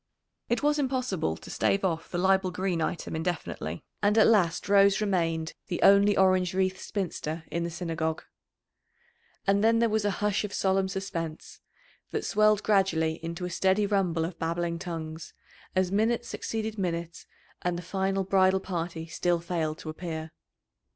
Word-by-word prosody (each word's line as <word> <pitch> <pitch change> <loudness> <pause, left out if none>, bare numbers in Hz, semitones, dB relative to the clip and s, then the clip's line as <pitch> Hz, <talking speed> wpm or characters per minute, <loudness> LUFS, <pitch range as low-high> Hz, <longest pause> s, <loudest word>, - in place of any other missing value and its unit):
It 240 +3 0
was 295 0 +3
impossible 255 - -1
to - - -11
stave 195 0 +1
off 165 -3 -2
the 175 - -3
Leibel 190 +1 +3
Green 180 -2 -1
item 160 0 -2
indefinitely, 160 - -3 0.2
and 210 +1 +3
at 220 - +7
last 185 -7 +3
Rose 200 -1 +5
remained 165 -6 0
the 175 - -3
only 200 +1 +6
orange 185 -1 +3
wreathed 190 0 +1
spinster 170 -5 -4
in 170 - -1
the 170 - -2
Synagogue. 165 -2 -3 1.2
And 200 +1 +3
then 225 +1 +5
there 230 -1 +2
was 220 -1 +2
a 205 - +2
hush 210 0 0
of 205 -1 -4
solemn 190 0 +2
suspense, 170 -5 -5 0.5
that - - -3
swelled 215 0 +3
gradually 165 -6 +1
into 170 +2 -4
a 180 - -4
steady 190 +3 +2
rumble 185 -5 +1
of 170 0 -7
babbling 170 +1 -1
tongues 165 -3 -6 0.4
as 185 -1 +2
minute 225 +4 +1
succeeded 220 -2 -4
minute 170 -2 -3 0.3
and 180 -1 -1
the 175 - -6
final 195 +2 -1
bridal 190 0 +3
party 170 -3 -4
still 175 +1 0
failed 165 -2 -2
to 160 - -8
appear. 160 -1 -6
185 Hz, 160 wpm, -28 LUFS, 165-200 Hz, 1.2 s, at